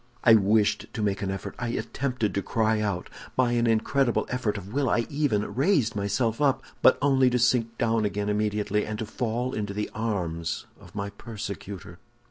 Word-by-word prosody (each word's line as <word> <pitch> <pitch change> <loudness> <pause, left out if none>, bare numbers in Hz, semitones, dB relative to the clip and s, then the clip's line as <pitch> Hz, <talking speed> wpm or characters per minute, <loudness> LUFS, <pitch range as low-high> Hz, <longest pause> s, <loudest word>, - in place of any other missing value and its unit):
"I 115 - +7
wished 105 0 +3
to 110 - -2
make 100 -1 0
an 100 - -1
effort; 95 0 -4
I 120 - -2
attempted 125 -1 -2
to 100 - 0
cry 110 +1 +1
out. 100 -4 -2 0.3
By 125 -2 +3
an 120 0 +2
incredible 120 +3 +2
effort 115 -4 -1
of 100 +2 -8
will 140 -2 +1
I 115 - +2
even 140 -9 0
raised 135 - +2
myself 110 +4 0
up, 140 -3 +2 0.2
but - - +6
only 135 -2 +4
to 125 - +1
sink 120 -1 +2
down 115 -2 +1
again 105 0 -1
immediately, 105 0 0
and 105 0 -4
to 110 - -3
fall 120 +3 -2
into 105 -2 -3
the 105 0 -3
arms 90 -7 -2
of - - -16
my 100 -1 -3
persecutor." 100 -4 -7
110 Hz, 185 wpm, -26 LUFS, 100-120 Hz, 0.3 s, I